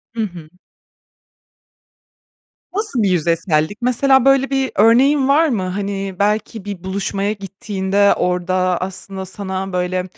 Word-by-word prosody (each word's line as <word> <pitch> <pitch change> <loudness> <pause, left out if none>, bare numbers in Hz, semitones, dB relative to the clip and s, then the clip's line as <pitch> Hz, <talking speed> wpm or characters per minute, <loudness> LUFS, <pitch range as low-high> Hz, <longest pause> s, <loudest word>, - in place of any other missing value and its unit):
Hı 225 - -1
hı. 175 -6 -7 2.3
Nasıl 405 - -1
bir 195 - +2
yüzeysellik? 165 +1 0
Mesela, 265 +1 +3
böyle 270 0 +4
bir 270 -1 0
örneğin 260 +6 +4
var 310 +4 +4
mı? 215 -7 -1
Hani, 195 0 -3
belki 210 0 -1
bir 195 -3 -6
buluşmaya 195 +1 -2
gittiğinde 200 0 0
orada 180 0 -1 0.3
aslında 190 +1 -6
sana, 190 0 -5
böyle, 180 0 -1
200 Hz, 120 wpm, -18 LUFS, 185-230 Hz, 2.3 s, böyle